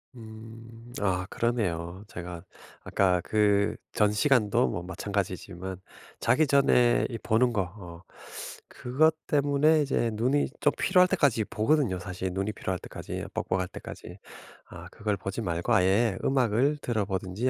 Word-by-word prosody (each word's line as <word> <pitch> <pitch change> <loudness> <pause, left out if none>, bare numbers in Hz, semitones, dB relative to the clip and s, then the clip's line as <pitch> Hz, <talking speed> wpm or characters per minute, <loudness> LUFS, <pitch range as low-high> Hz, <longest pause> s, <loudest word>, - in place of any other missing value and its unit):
음. 115 +1 -12
아 95 -2 0
그러네요. 95 -6 -2
제가 85 -4 -8 0.4
아까 90 -2 +2
그전 105 0 +1
시간도 120 -1 +3
뭐 85 - -3
마찬가지지만 95 0 -4 0.4
자기 155 -1 +3
전에 130 -3 +4
이 115 - -4
보는 120 +2 +2
거 105 - 0
어 90 -2 -9 0.7
그것 155 +6 +1
때문에 145 +2 +3
이제 130 -4 0
눈이 125 +7 +1
좀 - - +3
피로할 180 -1 +4
때까지 140 - +2
보거든요 110 - +1
사실. 95 0 -4
눈이 95 +2 -2
피로할 95 -3 -3
때까지 - - -7
뻑뻑할 95 0 -1
때까지. - - -10 0.5
아 90 0 -11
그걸 105 -2 -2
보지 95 +5 -4
말고 85 +4 -1
아예 95 +2 +3
음악을 130 +2 +2
들어 110 -4 -1
보든지 95 +5 -2
105 Hz, 290 characters per minute, -27 LUFS, 95-125 Hz, 0.7 s, 전에